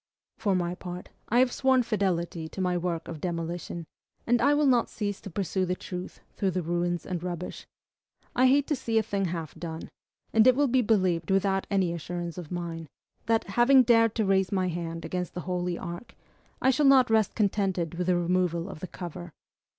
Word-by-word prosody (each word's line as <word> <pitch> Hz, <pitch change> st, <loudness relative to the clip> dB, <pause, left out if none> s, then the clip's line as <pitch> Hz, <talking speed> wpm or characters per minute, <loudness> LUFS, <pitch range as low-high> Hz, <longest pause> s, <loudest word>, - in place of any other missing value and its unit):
For 200 Hz, -3 st, +1 dB
my 175 Hz, -1 st, 0 dB
part, 180 Hz, 0 st, -8 dB, 0.2 s
I 235 Hz, -, +2 dB
have 250 Hz, 0 st, +4 dB
sworn 260 Hz, -1 st, +3 dB
fidelity 180 Hz, -7 st, -1 dB
to -, -, -9 dB
my 180 Hz, -1 st, +1 dB
work 175 Hz, -1 st, -2 dB
of 160 Hz, -3 st, -7 dB
demolition, 170 Hz, -1 st, -4 dB, 0.4 s
and 240 Hz, 0 st, +2 dB
I 285 Hz, +4 st, +4 dB
will 295 Hz, 0 st, +3 dB
not 245 Hz, -4 st, +3 dB
cease 205 Hz, -2 st, -4 dB
to 200 Hz, -, -8 dB
pursue 190 Hz, +1 st, -1 dB
the 180 Hz, 0 st, 0 dB
truth 180 Hz, 0 st, -7 dB
through 195 Hz, -, 0 dB
the 185 Hz, -1 st, -2 dB
ruins 175 Hz, 0 st, -1 dB
and 180 Hz, -3 st, -3 dB
rubbish. 180 Hz, 0 st, -5 dB, 0.7 s
I 255 Hz, +1 st, +5 dB
hate 280 Hz, +2 st, +4 dB
to 300 Hz, -, +2 dB
see 230 Hz, -3 st, -1 dB
a 220 Hz, -, +4 dB
thing 200 Hz, -2 st, -1 dB
half 165 Hz, -3 st, -4 dB
done; 165 Hz, -1 st, -7 dB, 0.4 s
and 220 Hz, +2 st, +6 dB
it 255 Hz, -, +6 dB
will 285 Hz, +1 st, +3 dB
be 255 Hz, 0 st, +3 dB
believed 185 Hz, -7 st, +1 dB
without 195 Hz, 0 st, +1 dB
any 190 Hz, -4 st, +1 dB
assurance 175 Hz, +1 st, -5 dB
of 165 Hz, -4 st, -8 dB
mine, 170 Hz, -2 st, -4 dB, 0.4 s
that, 225 Hz, 0 st, +2 dB
having 240 Hz, +6 st, +5 dB
dared 230 Hz, -2 st, +4 dB
to 220 Hz, -, +1 dB
raise 190 Hz, -1 st, +2 dB
my 185 Hz, -2 st, +1 dB
hand 165 Hz, -1 st, -4 dB
against 180 Hz, +1 st, -4 dB
the 180 Hz, -, -3 dB
Holy 180 Hz, 0 st, -2 dB
Ark, 175 Hz, +6 st, -8 dB, 0.5 s
I 265 Hz, -, +5 dB
shall 275 Hz, +2 st, +3 dB
not 260 Hz, -3 st, +6 dB
rest 220 Hz, -3 st, +2 dB
contented 195 Hz, -5 st, 0 dB
with 175 Hz, +1 st, -3 dB
the 180 Hz, -1 st, +3 dB
removal 175 Hz, -1 st, 0 dB
of -, -, -8 dB
the 185 Hz, -, -6 dB
cover. 175 Hz, -1 st, -8 dB
185 Hz, 200 wpm, -28 LUFS, 175-225 Hz, 0.7 s, and